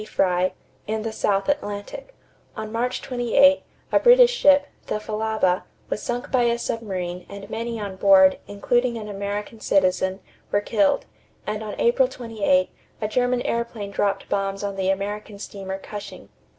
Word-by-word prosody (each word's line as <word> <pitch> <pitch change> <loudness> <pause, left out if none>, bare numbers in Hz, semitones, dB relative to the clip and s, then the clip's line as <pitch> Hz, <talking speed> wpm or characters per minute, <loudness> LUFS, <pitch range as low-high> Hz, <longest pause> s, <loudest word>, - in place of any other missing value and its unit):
Frye_, 185 -3 +1 0.3
in 215 0 -2
the 225 - -3
South 200 -1 0
Atlantic; 285 - -3 0.4
on 220 0 -5
March 245 +2 -2
28, 265 +3 +4 0.3
a - - +5
British - - +7
ship, 285 -11 +5 0.2
the - - -1
Falaba, 215 -4 0 0.3
was - - -2
sunk 245 0 -4
by 250 -2 +3
a 235 0 +2
submarine 185 -7 -4
and 200 0 -9
many 230 0 -3
on 200 -2 -5
board, 190 -1 +6
including 240 +4 0
an 215 -1 -6
American 205 +2 -4
citizen, 190 -1 +1 0.3
were 205 - +3
killed; 205 -1 +1 0.4
and 210 0 -3
on 215 -1 -5
April 250 +2 +4
28, 250 +2 0 0.3
a 215 - -1
German 245 +2 +1
airplane 235 -3 -3
dropped 200 0 -1
bombs 195 0 -2
on 200 -1 -3
the 190 -1 0
American 205 +2 -3
steamer 195 -1 -6
Cushing. 205 +1 -9
210 Hz, 150 wpm, -23 LUFS, 200-235 Hz, 0.4 s, British